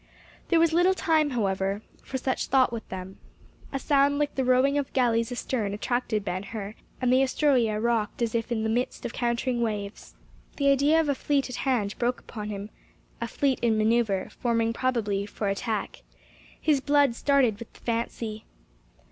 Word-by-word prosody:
There 335 - +3
was 330 -1 +3
little 360 +3 +4
time, 315 -4 +2
however, 195 -4 -1 0.2
for 265 - -4
such 260 0 -2
thought 260 -2 +3
with 230 - -6
them. 190 0 -7 0.5
A 275 - -2
sound 285 0 +3
like 295 0 0
the 265 - 0
rowing 255 +2 +3
of 280 - -4
galleys 235 -2 +2
astern 225 -4 -2
attracted 220 -1 -1
Ben 180 -1 -2
Hur, 200 0 -6 0.3
and 250 -1 +2
the 260 - +5
Astroea 255 -5 +2
rocked 230 0 0
as 230 - -1
if 230 +1 -2
in 220 -2 0
the - - 0
midst 245 +3 -2
of - - -4
countering 240 0 -1
waves. 210 -3 -4 0.4
The 280 -1 +3
idea 285 +4 +4
of 320 - +1
a 285 - +2
fleet 275 -1 0
at - - -5
hand 215 -6 +1
broke 245 +1 0
upon 210 -3 -7
him—a 210 +3 -9
fleet 270 +2 0
in 230 -2 +2
manoeuvre—forming 230 +1 +1
probably 215 -6 -1
for 205 0 -4
attack. 205 +1 -3 0.6
His 295 -4 +2
blood 285 -3 +3
started 250 -4 +2
with 235 - -9
the - - -18
fancy. 230 -2 -3
235 Hz, 175 wpm, -27 LUFS, 215-270 Hz, 0.6 s, the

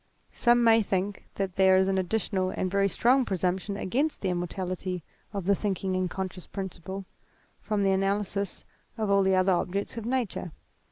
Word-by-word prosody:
Some 240 0 +4
may 225 -1 +6
think 195 0 -2
that 195 -2 -2
there 190 0 +5
is 190 0 +3
an 190 0 +2
additional 190 0 0
and 185 0 -2
very 200 0 +3
strong 255 +6 +3
presumption 190 0 -1
against 275 +11 0
the 195 - 0
immortality 180 0 -3 0.3
of 200 -4 -4
the 200 - +4
thinking 195 -1 -1
and 185 -1 0
conscious 185 -1 -5
principle, 190 0 -6 0.6
from 210 -2 0
the 195 - +3
analysis 200 0 -1 0.3
of 215 -2 0
all 200 0 +5
the 190 0 +3
other 185 +1 +3
objects 195 +5 -2
of 230 0 -4
Nature. 235 -9 -2
195 Hz, 170 wpm, -28 LUFS, 185-205 Hz, 0.6 s, may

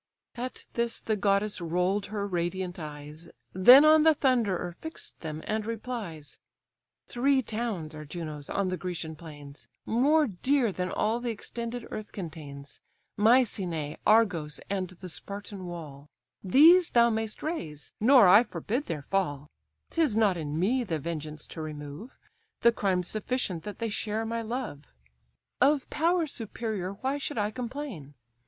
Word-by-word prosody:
At 250 +1 -6
this 235 -1 -1
the 220 - -1
goddess 200 -1 +1
rolled 180 +4 0
her 205 0 -3
radiant 180 -1 -2
eyes, 150 +1 -9 0.2
Then 250 +10 +9
on 310 0 +7
the 320 0 +5
Thunderer 215 - +1
fix'd 320 0 -7
them, 155 -1 -6
and 215 0 -1
replies: 215 - -6 0.7
"Three 265 +2 +2
towns 215 -9 -3
are 155 0 -7
Juno's 150 -2 -6
on 195 -2 0
the 185 - -2
Grecian 175 -3 -5
plains, 145 -5 -11 0.2
More 295 +7 +3
dear 250 +3 +1
than 180 -1 -3
all 225 +3 0
the 240 0 -3
extended 235 +2 -5
earth 215 -1 -6
contains, 150 -6 -8 0.3
Mycenæ, 200 - +2
Argos, 180 -9 +3
and 190 -2 -1
the 185 0 -10
Spartan 200 +1 -6
wall; 150 -5 -8 0.3
These 325 - +7
thou 235 -1 +5
mayst 220 -1 -3
raze, 160 - -5
nor 245 -2 +7
I 200 +5 +8
forbid 240 - -3
their 150 -3 -4
fall: 150 -5 -2 0.4
'Tis 310 -10 +2
not 210 -4 +4
in 155 -2 -4
me 240 +9 +2
the 170 -8 -2
vengeance 155 -1 -5
to 160 - -8
remove; 150 - -7 0.5
The 235 - +6
crime's 185 -5 0
sufficient 215 -5 -2
that 210 - -6
they 230 -1 -2
share 215 +1 -2
my 230 +1 -2
love. 225 - -5 0.8
Of 275 +1 +3
power 335 +3 +2
superior 220 - -4
why 270 +2 -1
should 285 -2 -4
I 210 0 0
complain? 240 - -6
200 Hz, 150 wpm, -28 LUFS, 165-240 Hz, 0.8 s, Then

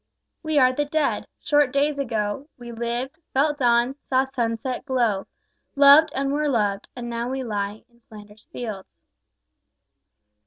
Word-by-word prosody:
We 315 -2 -1
are 255 -2 +5
the 290 +3 -1
Dead. 295 0 -1 0.2
Short 290 -4 +3
days 280 +1 +1
ago 225 +2 -2
We 240 -1 -9
lived, 240 +6 -4 0.2
felt 295 +2 +2
dawn, 240 +1 +2
saw 260 0 +3
sunset 245 -1 -3
glow, 235 -8 0 0.5
Loved, 285 +3 +7
and 275 +1 -1
were 300 0 0
loved, 205 -5 0
and 245 -1 -6
now 235 +1 -3
we 265 0 -3
lie 205 -2 -4
In 235 -1 -29
Flanders 210 0 -14
fields. 215 -6 -6
255 Hz, 145 wpm, -23 LUFS, 230-280 Hz, 0.5 s, Loved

